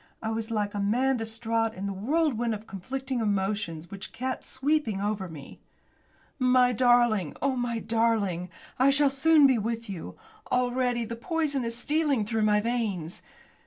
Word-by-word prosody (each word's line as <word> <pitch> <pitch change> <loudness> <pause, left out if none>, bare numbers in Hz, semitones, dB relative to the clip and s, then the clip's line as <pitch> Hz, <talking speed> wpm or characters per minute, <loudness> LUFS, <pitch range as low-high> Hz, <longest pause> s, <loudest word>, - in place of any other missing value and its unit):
I 220 - -3
was 225 0 -3
like 210 -2 -1
a 205 - -3
man 250 +6 +2
distraught 225 0 -1
in 190 +2 -5
the 200 - -2
whirlwind 240 - 0
of 210 +1 -10
conflicting 255 +7 -4
emotions 195 -6 -2
which 195 -1 -8
came 260 +1 -2
sweeping 265 -6 -1
over 200 -2 -2
me. 145 -4 -11 0.8
"My 250 -1 +4
darling! 240 - +3
Oh, 275 -1 0
my 245 -2 -1
darling! 220 -6 0 0.3
I 265 +2 +5
shall 275 0 +4
soon 300 +2 +5
be 260 -4 +4
with 230 0 -3
you. 180 -4 -7 0.3
Already 250 -1 +1
the 230 +1 -5
poison 290 0 -1
is 230 0 -2
stealing 290 -3 +1
through 220 +1 -1
my 210 -1 +4
veins. 210 -8 -2
230 Hz, 160 wpm, -27 LUFS, 205-255 Hz, 0.8 s, I